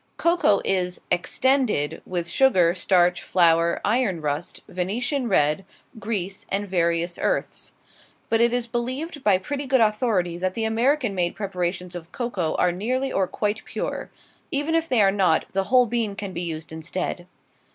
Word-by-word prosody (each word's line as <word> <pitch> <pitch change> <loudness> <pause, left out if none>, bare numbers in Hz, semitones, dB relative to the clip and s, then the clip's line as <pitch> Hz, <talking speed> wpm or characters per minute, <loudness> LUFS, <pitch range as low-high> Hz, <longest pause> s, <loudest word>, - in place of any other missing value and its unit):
Cocoa 335 - +3
is 180 -2 0
"extended" 215 - +1
with 175 -2 -3
sugar, 180 -5 +4
starch, 180 -1 +2
flour, 170 -1 +3
iron 215 -5 +1
rust, 150 +2 -4
Venetian 235 +8 -2
red, 150 0 +2 0.4
grease, 200 -3 -4
and 200 +1 -1
various 170 -1 0
earths. - - -2 0.5
But 225 0 +2
it 235 0 +4
is 245 -1 0
believed 255 +6 -4
by 200 -3 +4
pretty 280 +9 -4
good 260 0 +3
authority 210 -6 +1
that 185 0 -1
the 225 - -1
American 240 +2 +1
made 175 -2 -1
preparations 180 -2 -3
of 170 -2 -8
cocoa 205 -10 -2
are 180 - +2
nearly 255 +9 -2
or 190 -1 +1
quite 210 +3 -2
pure. - - -4 0.4
Even 290 +3 -1
if 330 0 +1
they 235 -5 +4
are 195 - +5
not 185 -5 +2
the 195 0 0
whole 250 +2 +5
bean 225 -3 -1
can 200 -2 -5
be 170 - -3
used 160 -2 -5
instead. 175 +2 -4
195 Hz, 160 wpm, -24 LUFS, 175-240 Hz, 0.5 s, are